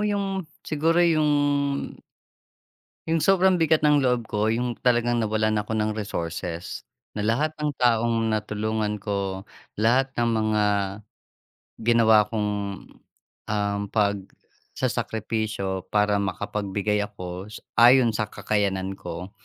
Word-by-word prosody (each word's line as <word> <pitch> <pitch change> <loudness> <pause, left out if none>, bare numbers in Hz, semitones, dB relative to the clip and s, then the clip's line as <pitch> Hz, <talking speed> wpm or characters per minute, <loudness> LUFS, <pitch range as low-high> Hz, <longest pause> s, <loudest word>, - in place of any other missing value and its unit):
yung, 195 -4 -2 0.2
siguro 160 +2 +1
yung 155 -3 +3 1.8
yung 160 -1 +1
sobrang 190 -2 +4
bigat 160 -1 +3
ng 145 -2 +4
loob 125 -3 +1
ko, 105 +1 0
yung 120 +1 -1
talagang 120 -1 +2
nawalan 110 0 +1
ako 110 +1 -3
ng 110 0 0
resources 85 -4 -4 0.3
na 105 - -3
lahat 120 +9 +1
ng 150 -1 0
taong 115 -2 +2
natulungan 105 0 -1
ko, 100 -1 -3 0.3
lahat 125 +5 +3
ng 120 0 +2
mga 110 -1 +1 1.2
ginawa 110 -3 +5
kong, 105 -2 -1 1.0
um, 100 -1 0
pagsasakripisyo 100 0 -3
para 105 -1 +3
makapagbigay 100 +1 -2
ako 90 -2 -7
s 110 - -9 0.2
ayon 120 0 +7
sa 110 0 -1
kakayanan 95 -2 -1
ko. 90 +3 -7
110 Hz, 110 wpm, -25 LUFS, 105-120 Hz, 1.8 s, ayon